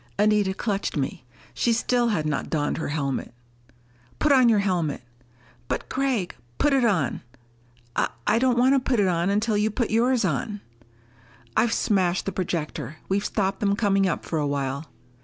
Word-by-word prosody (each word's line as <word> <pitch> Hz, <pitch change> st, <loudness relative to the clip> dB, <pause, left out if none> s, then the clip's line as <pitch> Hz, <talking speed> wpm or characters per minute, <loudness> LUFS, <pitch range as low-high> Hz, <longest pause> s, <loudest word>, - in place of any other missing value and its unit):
Anita 205 Hz, -2 st, +2 dB
clutched 200 Hz, -7 st, -2 dB
me. 135 Hz, -2 st, -3 dB, 0.3 s
She 240 Hz, -, +1 dB
still 240 Hz, +1 st, +1 dB
had 175 Hz, -9 st, 0 dB
not 150 Hz, -2 st, -2 dB
donned 150 Hz, -1 st, -1 dB
her -, -, -3 dB
helmet. 140 Hz, -5 st, -3 dB, 0.8 s
"Put 300 Hz, -, +2 dB
on 255 Hz, -3 st, +6 dB
your 220 Hz, -, +4 dB
helmet!" 180 Hz, -9 st, 0 dB, 0.6 s
"But -, -, -3 dB
Gregg 260 Hz, -8 st, -1 dB
" 120 Hz, -, -35 dB
"Put 295 Hz, -, +2 dB
it 270 Hz, -2 st, +3 dB
on!" 185 Hz, -, +1 dB, 0.7 s
"I.... -, -, +1 dB, 0.2 s
I 215 Hz, +2 st, +3 dB
don't 250 Hz, -1 st, +2 dB
want 255 Hz, +3 st, +5 dB
to 275 Hz, -, +4 dB
put 255 Hz, -2 st, 0 dB
it 200 Hz, -, +3 dB
on 175 Hz, +1 st, +1 dB
until 210 Hz, +2 st, +1 dB
you 210 Hz, +1 st, +2 dB
put 225 Hz, +1 st, -2 dB
yours 235 Hz, 0 st, +2 dB
on." 185 Hz, -, -2 dB, 0.9 s
"I've 235 Hz, -, +3 dB
smashed 185 Hz, -5 st, +1 dB
the 195 Hz, -, -1 dB
projector! 170 Hz, -4 st, -3 dB
We've 200 Hz, +1 st, +1 dB
stopped 195 Hz, -2 st, -1 dB
them 200 Hz, -1 st, +1 dB
coming 195 Hz, -2 st, +2 dB
up 175 Hz, -, -2 dB
for 160 Hz, -, -2 dB
a 145 Hz, -, 0 dB
while." 140 Hz, +1 st, -2 dB
200 Hz, 175 wpm, -25 LUFS, 165-230 Hz, 0.9 s, on